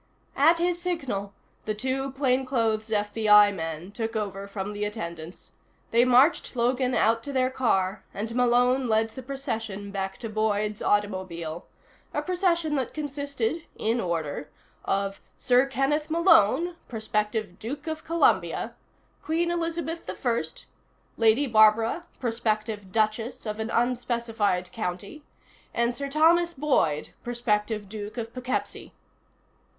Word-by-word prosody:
At 320 +5 +5
his 345 0 0
signal, 270 - -2 0.3
the 215 - -1
two 265 +4 -2
plainclothes 255 -5 +1
FBI 210 -1 +5
men 165 +1 -5
took 225 +1 -4
over 200 -2 -3
from 200 0 -5
the 205 0 -3
attendants. 170 -5 -6 0.4
They 235 +2 +5
marched 255 +5 +4
Logan 250 +1 +1
out 230 +1 +3
to 285 - -6
their 260 -1 +1
car, 195 -7 0
and 220 +3 -4
Malone 250 +1 +3
led 220 0 +2
the 260 - -8
procession 225 -7 -4
back 195 -1 -3
to 230 - -6
Boyd's 215 -1 -1
automobile, 185 -5 -1 0.5
a - - 0
procession 350 -4 +1
that 260 - -3
consisted 285 0 -3
(in 230 +2 0
order) 160 -5 -3 0.4
of 195 0 -1 0.2
Sir 250 +1 +3
Kenneth 275 +3 0
Malone, 335 - +4
prospective 215 -3 -2
Duke 260 +9 -6
of 315 -1 -4
Columbia, 335 +1 +1 0.5
Queen 335 +2 0
Elizabeth 335 -1 -3
I, 235 -9 0 0.7
Lady 230 +5 +4
Barbara, 225 +6 +4
prospective 215 -4 -1
Duchess 220 +3 -1
of 215 0 -4
an 220 +1 -2
unspecified 235 -6 0
county, 205 - -5 0.5
and 235 +1 +1
Sir 280 +2 -4
Thomas 335 +4 +4
Boyd, 260 - +1
prospective 215 -3 -1
Duke 210 +2 -7
of 230 -1 -5
Poughkeepsie. 250 0 -4
230 Hz, 125 wpm, -26 LUFS, 210-270 Hz, 0.7 s, At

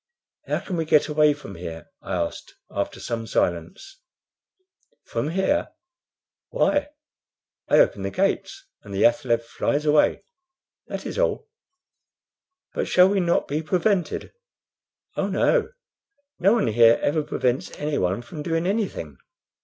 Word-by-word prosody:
"How - - -1
can 180 - -4
we 165 - -1
get 150 -2 +4
away 150 0 +4
from 145 -9 -10
here?" 85 -2 -7 0.2
I - - -4
asked, 85 -1 -4 0.2
after - - -3
some 115 -1 -4
silence. 85 - -2 1.1
"From 145 - -3
here? 190 - 0 0.8
why, 290 0 +1 0.8
I - - +4
open - - +4
the - - -2
gates, 390 0 -1 0.2
and 100 -1 -9
the 95 - +2
athaleb 130 -6 +2
flies 145 +5 -1
away; 150 0 +3 0.6
that - - -6
is - - -4
all." 485 -2 0 1.3
"But - - -2
shall 180 +1 +6
we 200 0 +1
not 170 -2 +1
be 150 +3 -1
prevented?" 180 +2 0 0.8
"Oh - - 0
no. 475 -3 +2 0.7
No 195 +4 +4
one 230 -3 +2
here 115 +1 +5
ever 155 +2 +2
prevents 130 -3 -1
anyone 120 -8 -1
from 150 +6 -8
doing 165 +2 -1
anything. 190 - -2
150 Hz, 135 wpm, -24 LUFS, 115-190 Hz, 1.3 s, shall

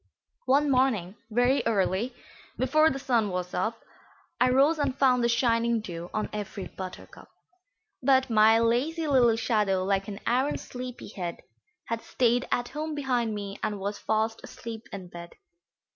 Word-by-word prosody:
One 280 +2 +3
morning, 230 -8 +1
very 245 +4 +3
early, 210 +3 0 0.4
before 310 +5 +4
the 270 - -3
sun 240 -6 +1
was 180 -1 -4
up, 225 +1 -1 0.6
I 250 - +4
rose 280 +5 +4
and 275 -2 0
found 250 -3 +3
the 235 - +3
shining 235 -1 +2
dew 175 -4 -7
on 215 - -2
every 205 -2 -5
buttercup; 185 -1 -9 0.7
But 265 0 +4
my 220 -1 +5
lazy 255 +9 +1
little 250 -6 +4
shadow, 210 -5 +1
like 195 0 0
an 200 -1 -6
arrant 255 +4 +1
sleepy 250 -2 -8
head, 175 -4 -6 0.4
Had 230 0 -3
stayed 245 0 +1
at 245 0 0
home 305 0 -4
behind 245 -6 0
me 200 -1 -6
and 210 -2 -2
was 200 +1 -4
fast 220 +1 -1
asleep 230 -1 -8
in 190 -2 -7
bed. 170 0 -10
230 Hz, 155 wpm, -27 LUFS, 205-260 Hz, 0.7 s, my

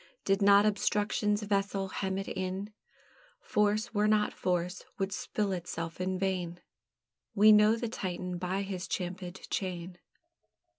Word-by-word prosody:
Did 195 +1 +2
not 200 +1 +7
obstruction's 210 0 +1
vessel 200 -1 0
hem 190 0 -2
it 195 - -4
in, 190 +3 -4 0.7
Force 210 +2 +1
were 210 0 +2
not 215 -1 +2
force, 180 0 -1
would 195 0 -1
spill 205 0 -2
itself 170 -1 -4
in 185 0 -1
vain; 180 -2 -2 0.8
We 215 +1 +7
know 210 +1 +6
the 235 +1 -3
Titan 180 -4 -4
by 185 +2 -1
his 190 -2 -5
champèd 180 0 -5
chain. 180 -2 -3
195 Hz, 135 wpm, -31 LUFS, 180-210 Hz, 0.8 s, not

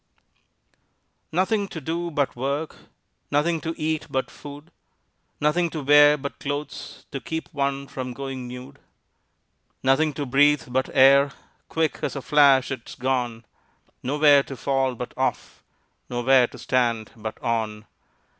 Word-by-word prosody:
Nothing 200 +4 +1
to 165 - -7
do 165 +4 -3
but 145 -4 -1
work, 140 +5 -3 0.5
Nothing 160 +3 +1
to 165 0 -4
eat 155 0 -1
but 130 0 -2
food, 145 +3 -11 0.7
Nothing 165 +4 +2
to 155 -3 -5
wear 145 +1 +7
but 140 0 -7
clothes 145 +1 -6
To 135 - -4
keep 160 0 -5
one 140 -1 -1
from 130 -2 -6
going 135 -1 -6
nude. 125 +1 -10 1.0
Nothing 135 +4 +3
to 145 +1 -4
breathe 145 +2 +4
but 130 +1 0
air 140 +1 +5 0.4
Quick 160 -2 0
as - - -2
a 140 - -4
flash 140 -3 +5
'tis 130 -4 -6
gone; 125 -3 -2 0.6
Nowhere 145 +1 +5
to 135 -1 -8
fall 135 -1 0
but 125 +1 -7
off, - - -3 0.5
Nowhere 125 +1 +4
to - - -13
stand 120 -4 0
but 110 -1 -7
on. 110 -2 -2
140 Hz, 135 wpm, -24 LUFS, 130-150 Hz, 1.0 s, wear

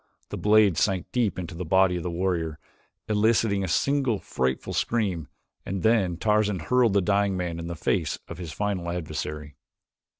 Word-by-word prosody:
The - - -5
blade 105 -4 +4
sank 95 -3 +1
deep 120 -6 0
into 85 -3 -5
the 85 +2 -5
body 95 +1 +3
of 90 - -3
the 90 - -3
warrior, 85 -3 -1 0.5
eliciting 105 -1 +2
a - - -2
single 135 +5 +1
frightful 65 -7 -2
scream, 95 -9 -1 0.4
and 95 -2 -4
then 100 -7 +2
Tarzan 105 0 +2
hurled 120 +6 +2
the 100 - +4
dying 100 0 +1
man 85 -2 -3
in 85 - -5
the 85 - -4
face 80 -2 -1
of 85 - -8
his 85 -4 -6
final 95 0 -2
adversary. 75 -3 -5
95 Hz, 170 wpm, -26 LUFS, 85-105 Hz, 0.5 s, blade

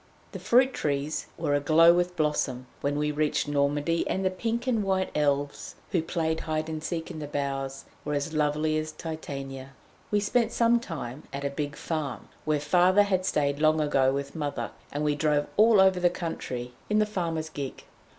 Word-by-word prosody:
The - - -6
fruit 255 +2 +4
trees 145 +1 -2
were 145 - 0
a 145 - +3
glow 165 +3 +6
with 175 0 0
blossom 150 -5 0
when 145 +1 -1
we 150 0 0
reached 150 0 0
Normandy, 145 +3 +1
and 190 0 -1
the 185 - +2
pink 230 +5 -2
and 230 -5 +1
white 190 -1 0
Elves 145 -1 -1 0.2
who 180 -5 +2
played 160 -1 -1
hide 155 0 -2
and 155 -1 -4
seek 165 +1 -3
in 160 - -7
the 150 - -5
boughs 135 -1 -3 0.2
were 150 0 -2
as 145 +3 -2
lovely 155 +1 +1
as 155 0 -4
Titania. 135 -4 -6 0.4
We 210 - +2
spent 230 +3 +1
some 235 0 +4
time 145 - -7
at 140 0 -4
a 140 - -1
big 145 +1 -3
farm, 155 -5 -4 0.2
where 155 -1 +1
Father 180 +6 +4
had 185 -2 0
stayed 140 -1 +1
long 155 0 +4
ago 135 -3 +3
with 140 0 -4
Mother, 145 -3 -3 0.2
and 145 +1 -2
we 150 -1 +2
drove 145 0 +1
all 220 0 +6
over 190 -1 +5
the 175 0 +4
country 125 -8 -5 0.2
in 210 - +2
the 215 - +4
farmer's 165 -6 -2
gig. 140 -4 -6
155 Hz, 190 wpm, -27 LUFS, 145-180 Hz, 0.4 s, glow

